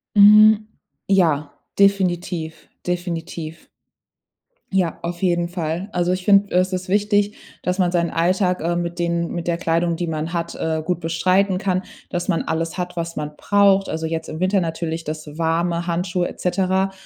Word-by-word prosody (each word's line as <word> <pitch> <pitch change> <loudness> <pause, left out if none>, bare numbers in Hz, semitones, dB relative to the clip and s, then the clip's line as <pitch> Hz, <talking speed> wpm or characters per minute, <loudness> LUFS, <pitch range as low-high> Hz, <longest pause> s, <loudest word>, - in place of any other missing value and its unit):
Hm, 210 +1 +8 0.5
ja, 160 -7 +2 0.3
definitiv, 175 -4 +1 0.2
definitiv. 170 -2 -4 1.0
Ja, 185 -4 0
auf 170 0 -5
jeden 175 -2 +2
Fall. 170 +1 -3
Also, 175 0 +1
ich 185 0 -2
finde, 200 -1 +4
es 185 +1 +2
ist 185 0 -3
wichtig, 205 +1 +1 0.3
dass 180 +1 -1
man 180 -2 +3
seinen 170 -1 +1
Alltag, 180 +2 +1
äh, 170 +2 0
mit 175 0 -3
denen 170 0 -1
mit 170 -1 -4
der 170 -1 +1
Kleidung, 170 0 0
die 175 +1 -3
man 160 +1 -3
hat, 170 -1 -3
äh, 160 -1 -1
gut 175 +2 -1
bestreiten 185 +4 +1
kann, 185 -1 -1 0.3
dass 175 -1 -3
man 175 -4 +1
alles 165 +2 -2
hat, 180 -1 -4
was 170 0 -3
man 150 0 -4
braucht. 200 -1 +3
Also 160 0 -3
jetzt 160 0 -3
im 160 - -6
Winter 190 +2 +3
natürlich 165 -1 -3
das 155 0 -6
warme 170 +1 0
Handschuhe 175 +1 -1
et - - -10
cetera. 190 +1 +1
175 Hz, 170 wpm, -21 LUFS, 165-185 Hz, 1.0 s, Hm